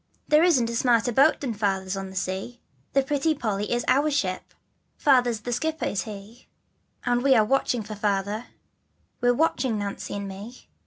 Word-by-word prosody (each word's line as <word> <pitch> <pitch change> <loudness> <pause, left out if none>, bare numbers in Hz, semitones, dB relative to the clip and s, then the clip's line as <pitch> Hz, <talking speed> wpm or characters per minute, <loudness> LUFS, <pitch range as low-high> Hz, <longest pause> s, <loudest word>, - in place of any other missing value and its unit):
There 305 +2 +5
isn't 285 -10 +4
a 235 - -4
smarter 240 0 +2
boat 275 +6 +4
Than 260 -5 -2
Father's 195 -2 -1
on 195 0 -5
the 190 - -12
sea, 190 +6 -4 0.3
The 275 - +3
Pretty 295 +3 0
Polly 210 -4 -2
is 240 0 0
our 280 +4 +3
ship, 190 -11 -2 0.4
Father's 245 -6 +3
the 245 +2 -3
skipper 315 +5 -2
is 200 - -2
he, 210 +2 -10 0.6
And 245 0 +2
we 270 0 +4
are 215 -2 +4
watching 250 -1 +1
for 215 +1 -7
Father, 205 +2 -1 0.7
We're 245 0 +3
watching, 260 -6 +1
Nancy 200 -1 -5
and 200 0 -4
me. 205 +6 -10
235 Hz, 175 wpm, -25 LUFS, 200-265 Hz, 0.7 s, There